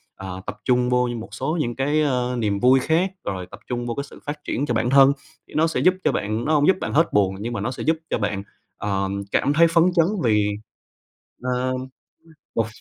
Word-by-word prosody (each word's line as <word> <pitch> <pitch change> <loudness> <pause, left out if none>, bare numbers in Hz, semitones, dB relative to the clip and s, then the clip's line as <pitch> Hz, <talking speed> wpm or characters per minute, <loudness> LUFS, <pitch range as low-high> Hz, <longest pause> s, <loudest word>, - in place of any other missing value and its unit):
ờ, 95 -1 -7
tập - - -6
trung 125 -1 +2
vô 125 0 +2
như 120 - -3
một 110 - -9
số 155 +6 -2
những 120 -4 -2
cái, 145 +3 +1
a, 125 -3 0
niềm 105 -4 0
vui 130 +4 +5
khác, 165 +7 +1
rồi 95 -2 -3
tập - - -10
trung 120 -1 -3
vô 120 - -2
cái 140 - -2
sự 140 - -13
phát 150 0 -5
triển 140 - -1
cho 120 - -1
bản 120 +1 +1
thân 135 +1 +7 0.3
thì - - -17
nó 160 +2 +3
sẽ 165 - -1
giúp 185 - +5
cho - - +3
bạn 110 +3 -2
nó 155 - +1
hông 145 -1 +4
giúp 190 - +5
bạn - - -3
hết 165 +3 +3
buồn 95 -2 +2
nhưng 115 +3 -4
mà 105 - -3
nó 115 +5 -2
sẽ 130 - -6
giúp 160 +1 +2
cho - - 0
bạn, 100 -2 -2 0.3
ờ, 100 -1 -1 0.2
cảm 145 - +2
thấy 165 +2 +6
phấn 165 0 +4
chấn 165 -2 +4 0.2
vì 105 -3 +3 0.9
ờ, 125 0 0 0.8
một 115 - +1
125 Hz, 240 wpm, -23 LUFS, 110-145 Hz, 0.9 s, thân